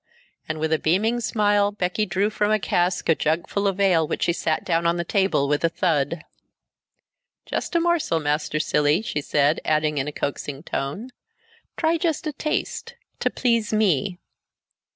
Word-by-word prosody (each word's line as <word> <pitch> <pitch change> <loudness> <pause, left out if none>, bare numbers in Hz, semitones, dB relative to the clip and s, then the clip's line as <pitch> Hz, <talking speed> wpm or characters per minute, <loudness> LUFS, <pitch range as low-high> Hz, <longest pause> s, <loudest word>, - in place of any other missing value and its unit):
And 155 0 -3
with 160 +1 0
a 160 - +2
beaming 215 +9 +1
smile 205 -2 +2
Becky 205 +1 -1
drew 195 +4 0
from 210 -1 0
a 215 - +4
cask 180 -2 0
a 165 - +6
jugful 165 +6 -1
of 195 0 -1
ale 180 -5 +3
which - - -2
she 170 - +2
set 160 -2 -1
down 170 -1 +1
on 170 +1 +1
the 170 - -1
table 190 -6 +1
with 145 +2 0
a 165 - +4
thud. 165 -2 0 1.2
"Just - - -3
a - - +5
morsel, 335 - +1
Master 150 0 -1
Cilley," 150 +4 +2
she 150 -9 -2
said, 145 +2 +1
adding 155 -1 +1
in 135 - -2
a - - -3
coaxing 140 0 -4
tone, 185 - -4 0.7
"Try 330 0 +1
just 325 -2 -1
a 305 - -2
taste, 305 +2 -3 0.2
to - - +1
please 230 -4 0
me." 195 -4 +1
175 Hz, 175 wpm, -23 LUFS, 155-210 Hz, 1.2 s, a